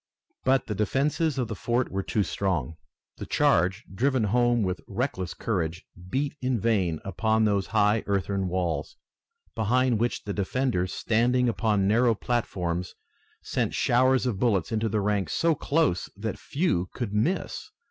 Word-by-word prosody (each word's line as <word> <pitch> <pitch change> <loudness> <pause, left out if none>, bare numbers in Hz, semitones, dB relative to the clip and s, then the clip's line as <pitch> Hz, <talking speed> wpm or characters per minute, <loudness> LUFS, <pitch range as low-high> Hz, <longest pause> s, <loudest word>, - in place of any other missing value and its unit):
But 130 -1 +3
the 105 - -3
defenses 140 - 0
of 125 -3 0
the 110 - -4
fort 120 +4 -1
were 95 - -1
too 105 +2 0
strong. 85 -8 -2 0.4
The - - -7
charge, 95 +6 +2
driven 130 +3 +1
home 120 +2 +2
with 90 -1 -2
reckless 100 -4 -3
courage, 85 -5 -2 0.2
beat 140 +4 -1
in 130 -2 0
vain 95 -8 +1
upon 110 +4 +1
those 100 -2 +1
high 105 +2 +2
earthen 100 -1 0
walls, 85 -5 -2 0.6
behind 120 +2 +2
which 120 +1 -1
the 100 - -4
defenders, 100 -2 -1
standing 125 +3 +2
upon 110 -4 +1
narrow 115 +2 +3
platforms, 90 -7 -2 0.5
sent - - -1
showers 130 +2 +3
of 115 -7 -1
bullets 105 -5 +1
into 110 0 0
ranks 100 -1 0
so 165 0 +3
close 145 - 0
that 110 +1 -4
few 140 - -1
could 115 -6 -4
miss. 150 - -1
110 Hz, 145 wpm, -26 LUFS, 95-125 Hz, 0.6 s, But